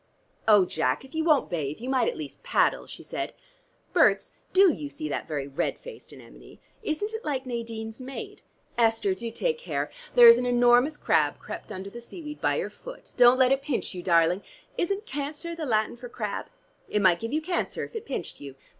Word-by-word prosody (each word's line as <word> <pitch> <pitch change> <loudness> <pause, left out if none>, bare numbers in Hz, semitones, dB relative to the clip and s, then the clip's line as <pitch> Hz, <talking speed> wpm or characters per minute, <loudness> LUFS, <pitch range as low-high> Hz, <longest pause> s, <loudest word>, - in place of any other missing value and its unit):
"Oh, 205 -4 +7
Jack, 130 - -1
if 265 - -17
you 320 0 0
won't 310 -4 +3
bathe 155 -4 -3
you 245 - -6
might 260 -3 +2
at - - -2
least 145 -3 -8
paddle," - - +1
she - - -10
said. - - -5 0.6
"Berts, - - +4 0.2
do 380 -3 +6
you 290 - -6
see 310 +1 -6
that - - -3
very 145 -3 -3
red 140 - -2
faced - - -12
anemone? - - -14 0.2
Isn't 415 +3 -2
it 445 - -5
like 270 -3 -2
Nadine's 230 -1 -5
maid? 260 +1 -8 0.4
Esther, 225 -4 +3
do 230 +5 -5
take 470 - -1
care. - - -3 0.2
There's 470 -1 +9
an 250 - -1
enormous 245 +4 +4
crab - - +2
crept - - -8
under 195 0 -6
the 235 - -9
seaweed 300 +4 -9
by - - +2
your - - -2
foot. - - -12
Don't 245 0 +7
let 260 0 +4
it 270 0 +2
pinch 280 -6 -3
you, 180 - -6
darling: 170 +1 +3 0.3
isn't 395 +4 -1
cancer 295 +3 -4
the 325 -3 -5
Latin 220 -1 +1
for 245 0 -10
crab? 210 -4 -4 0.4
It 210 - +1
might 180 -2 +5
give 230 +1 -4
you 305 - +1
cancer 350 +3 -2
if - - -15
it 450 - -6
pinched 265 -10 -5
you. 140 -2 -9
250 Hz, 200 wpm, -27 LUFS, 210-310 Hz, 0.6 s, There's